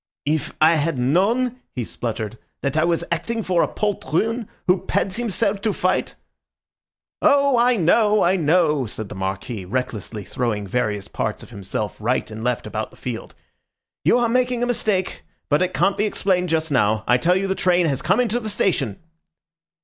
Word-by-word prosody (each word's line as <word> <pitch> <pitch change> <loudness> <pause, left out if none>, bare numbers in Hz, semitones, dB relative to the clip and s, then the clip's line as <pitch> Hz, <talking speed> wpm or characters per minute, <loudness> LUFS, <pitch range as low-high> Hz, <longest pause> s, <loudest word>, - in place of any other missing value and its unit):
"If 150 0 0
I 160 +1 +5
had 155 -1 0
known," 215 - +1 0.2
he 125 - -2
spluttered, 110 -1 -4 0.2
"that 140 0 -1
I 155 - +3
was 170 0 +1
acting 225 +7 -1
for 180 -3 +2
a - - +2
poltroon 210 - -1 0.2
who 180 0 +2
pads 195 0 0
himself 210 -3 -1
to 215 -1 0
fight—" 185 0 0 1.1
"Oh, 280 -1 +4
I 245 +1 +4
know, 210 +3 +3
I 180 +2 +3
know!" 155 -5 +2
said 110 -1 -6
the - - -6
Marquis, 95 +2 -4
recklessly 110 -1 -4
throwing 105 +1 -2
various 105 -2 -1
parts - - -3
of - - -14
himself 100 +1 -4
right 115 +1 -1
and 110 +1 -7
left 125 -1 -1
about 110 0 -4
the - - -19
field. 120 -3 -6 0.7
"You - - +4
are 240 -1 +2
making 250 0 +1
a - - +3
mistake; 215 -6 -1 0.3
but 145 +2 +3
it 185 0 +1
can't 195 - +2
be 210 - +2
explained 185 -3 0
just 160 -1 0
now. 110 -4 +2
I 120 - +4
tell 175 +6 +3
you 190 +1 0
the 190 - 0
train 180 -2 +2
has 140 -4 0
come 185 - +2
into 240 -1 +1
the 220 -2 -4
station!" 140 - 0
165 Hz, 180 wpm, -22 LUFS, -, 1.1 s, I